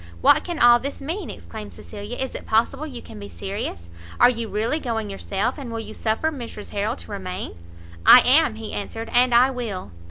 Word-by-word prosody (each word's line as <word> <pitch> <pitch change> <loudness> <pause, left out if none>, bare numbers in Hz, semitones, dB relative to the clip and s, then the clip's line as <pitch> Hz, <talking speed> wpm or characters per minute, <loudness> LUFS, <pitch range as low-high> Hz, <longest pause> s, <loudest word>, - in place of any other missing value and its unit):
"What - - +5
can 345 -2 -4
all 240 -2 +7
this 275 +3 -5
mean?" 330 +6 -4
exclaimed 215 -2 -9
Cecilia, 210 +3 -8
"is 265 - -3
it - - -8
possible 265 +7 +1
you 255 -5 -8
can - - -11
be 100 0 -8
serious? 85 -1 -5 0.3
Are - - +7
you 230 -2 -4
really 225 +9 0
going 225 -6 -3
yourself, 200 +7 -2
and 255 -4 -6
will 230 - -3
you 220 -1 -7
suffer 225 +10 0
Mrs 235 -7 -8
Harrel 210 +4 -1
to 220 - -11
remain?" 185 - -5 0.5
"I 250 - +10
am," 265 -2 +5
he 220 -1 -7
answered, 225 +2 -5
"and 245 +1 +4
I 245 +3 +5
will." 215 - -5
230 Hz, 200 wpm, -23 LUFS, 210-255 Hz, 0.5 s, I